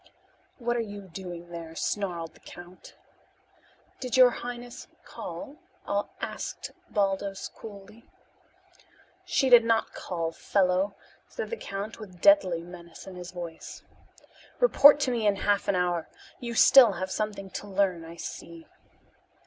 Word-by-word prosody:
"What 240 -1 -1
are - - 0
you 205 -2 -7
doing 175 -2 -8
there?" 165 -1 -8
snarled 170 -4 -2
the - - -20
count. 175 +1 -13 1.0
"Did 255 0 -2
your 255 -1 +8
highness 240 0 -7 0.2
call?" 285 - -8 0.6
asked - - -5 0.2
Baldos 195 -1 -1
coolly. 210 +1 -12 1.2
"She 270 - +2
did 240 -2 +8
not 230 -1 +1
call, 165 -3 -3
fellow," 190 +2 +1 0.3
said - - -6
the - - -1
count 200 - -6
with 185 -5 -11
deadly 185 - +5
menace 170 -1 -12
in 190 - -9
his 180 -1 -8
voice. 175 -2 -8 0.8
"Report 290 - +7
to 255 - +1
me 230 -3 0
in 205 - +3
half 200 +1 0
an 200 - +2
hour. 175 -2 0 0.3
You 235 -1 -5
still 240 -2 +8
have 185 +1 -4
something 205 -3 -3
to 205 - -6
learn, 190 -4 0
I 165 +1 -10
see." 165 0 -8
195 Hz, 135 wpm, -28 LUFS, 175-230 Hz, 1.2 s, your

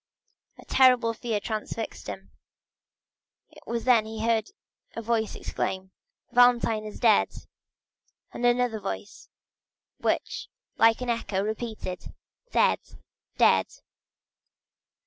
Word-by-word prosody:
A - - -14
terrible 250 -3 +4
fear 225 -2 -2
transfixed 220 +1 -5
him. - - -8 1.2
It - - -16
was 230 -1 -2
then 240 -3 +5
he 220 0 -4
heard 225 -2 +1 0.5
a 230 - -4
voice 220 -1 0
exclaim 190 0 -4 0.4
"Valentine 240 -3 +4
is 210 - -8
dead!" 225 -4 +4 1.0
and - - -6
another 245 -2 +2
voice 95 - -7 0.7
which, - - -1 0.3
like 225 +2 +4
an 250 - -3
echo 200 -4 -1
repeated: 215 -4 -5 0.3
"Dead,—dead!" - - +1
225 Hz, 100 wpm, -27 LUFS, 215-240 Hz, 1.2 s, then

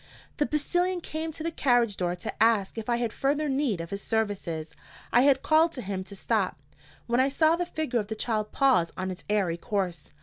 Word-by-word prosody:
The 295 - +1
postilion 350 +4 0
came 320 -1 -4
to 310 - -7
the 335 - -1
carriage 245 -8 +2
door 180 -1 -1
to 180 - -7
ask 220 -4 +2
if 225 0 -5
I 240 - +3
had 235 -2 -2
further 290 +3 0
need 265 - 0
of 165 0 -6
his 200 0 -3
services. 195 -9 -2 0.4
I 245 - +6
had 270 0 +4
called 320 +2 +4
to 255 - -6
him 190 -1 -3
to 200 - -9
stop, - - 0 0.5
when 240 +1 +1
I 265 +1 +4
saw 315 +3 +3
the 350 0 -2
figure 310 -8 -1
of 205 - -3
the 220 - -4
child 215 -1 -2
pause 255 -12 +3
on 185 0 -2
its 180 - -8
airy 195 -5 +1
course. 185 -6 -3
235 Hz, 215 wpm, -27 LUFS, 195-295 Hz, 0.5 s, I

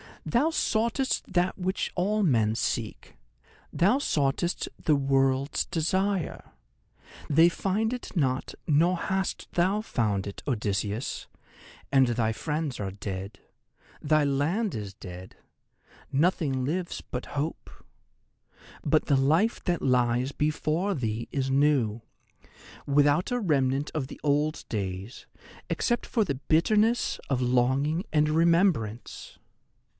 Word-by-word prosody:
Thou 255 +7 +2
soughtest 235 -4 0
that 180 0 +1
which 185 0 -2
all 205 +4 +1
men 115 - +3
seek—thou 110 - -2
soughtest 160 - 0 0.2
The 155 - +4
World's 135 0 +1
Desire. 185 +2 -1 0.8
They 160 +4 +6
find 200 +5 -1
it 250 -3 -6
not, 130 -6 0
nor 165 +5 +3
hast 190 +2 -2
thou 190 +5 +2
found 105 - -1
it, 100 - -7
Odysseus; 105 -2 -2 0.6
and 135 -2 +5
thy 115 -2 0
friends 150 +1 -3
are 100 -2 -3
dead; 100 0 -6 0.6
thy 155 0 +3
land 155 +10 0
is 105 -3 -5
dead; 90 -2 -10 0.7
nothing 140 -3 +1
lives 175 +5 -3
but 125 - -6
Hope. 150 +3 -3 1.1
But - - +2
the 140 - +3
life 160 - +2
that 175 -2 0
lies 125 0 +2
before 155 +6 0
thee 115 -4 -3
is 135 -2 -1
new, 135 -6 +2 0.8
without 145 - +3
a 245 - +1
remnant 140 - +1
of 140 -4 -1
the - - -11
old 150 +1 0
days, 100 +2 -4 0.4
except 240 -1 0
for 225 - +1
the 140 -8 -2
bitterness 210 - +2
of 130 -2 0
longing 130 +7 +1
and 150 -1 +3
remembrance. 160 - +1
145 Hz, 115 wpm, -27 LUFS, 125-180 Hz, 1.1 s, They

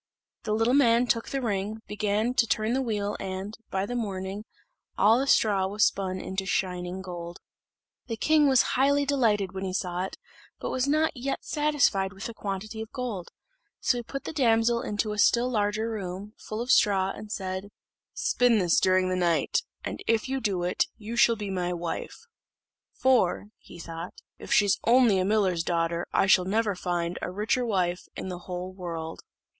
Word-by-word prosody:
The 215 - 0
little 225 +3 +2
man 240 -3 +5
took 230 -1 0
the 270 -1 -2
ring, 210 0 -2
began 210 +3 0
to 235 -2 +3
turn 215 +2 0
the 265 - +1
wheel, 210 -4 -2
and, 190 +2 -5
by 190 0 -1
the 245 - -5
morning, 200 -3 -4 0.5
all 225 +4 +5
the 275 - -1
straw 200 -7 +3
was 205 +2 +2
spun 190 -1 -1
into 190 +1 -4
shining 180 -1 -2
gold. 175 -2 -7 0.7
The 225 -2 -4
king 305 +3 +4
was 265 -2 +5
highly 280 +2 +3
delighted 220 -9 +1
when 190 0 -5
he 185 -1 -3
saw 180 -1 -2
it, - - -8 0.4
but - - -4
was 260 +1 0
not 310 +2 +2
yet 270 +2 -3
satisfied 285 -11 +1
with 195 0 -8
the 230 - -5
quantity 210 +1 -5
of 220 - -8
gold; 230 -9 -4 0.5
so 245 - +1
he - - -3
put 275 +4 -6
the - - -6
damsel 235 -4 +3
into 210 +1 -2
a 210 - -4
still 240 +4 +4
larger 210 0 0
room, 200 0 -5
full 215 +1 -6
of 245 +2 0
straw, 195 -5 +4
and 210 +1 -9
said, 190 0 -4 0.5
"Spin 245 -2 +3
this 175 -4 +3
during 185 0 +3
the 185 - 0
night; 170 - +1 0.2
and - - -5
if 225 +2 +2
you 265 0 -2
do 195 -6 -1
it, 180 - +1
you 225 +1 -6
shall 235 -1 +5
be 205 -2 -5
my 180 -1 -1
wife." 175 - -5 0.7
"For," 230 -6 +2
he - - -14
thought, 165 +1 -7 0.2
"if - - -9
she's 205 -2 +4
only 235 -4 +5
a 185 - +1
miller's 195 -4 +2
daughter 170 0 -1
I - - +3
shall 190 -2 +5
never 210 +2 +1
find 175 -1 -2
a - - -3
richer 220 +7 0
wife 185 -6 -1
in - - -5
the 180 -1 -5
whole 180 +1 -6
world." 165 -3 -6
205 Hz, 185 wpm, -27 LUFS, 185-235 Hz, 0.7 s, man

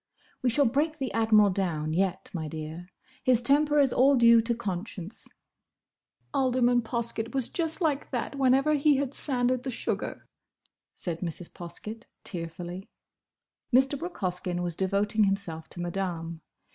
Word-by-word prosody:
"We 255 - +2
shall 280 +4 +3
break 295 +6 +1
the 265 -3 -3
Admiral 215 -3 +4
down, 160 -5 -1
yet, 185 +1 -1
my 160 -4 -3
dear. 160 +3 -7 0.4
His 255 -4 +4
temper 295 +3 +3
is 275 -3 +4
all 275 +2 +5
due 235 -2 +6
to 235 +1 -1
conscience." 195 -2 -5 1.1
"Alderman 250 -3 +2
Poskett 230 +1 -2
was 260 -3 +2
just 325 +1 0
like 300 -4 0
that 250 +2 -3
whenever 270 +2 +3
he 290 -1 +3
had 275 -1 -2
sanded 255 -3 0
the 265 - -4
sugar," 245 - -4 0.7
said 170 -3 -4
Mrs. 170 -1 -4
Poskett, 215 +6 -6 0.2
tearfully. 175 +1 -4 0.8
Mr. 265 +3 +4
Brooke 345 +6 -6
Hoskyn 180 -1 -1
was 175 -2 -2
devoting 205 +3 +1
himself 195 -5 0
to - - -9
Madame. 175 -2 -4
225 Hz, 145 wpm, -28 LUFS, 180-265 Hz, 1.1 s, due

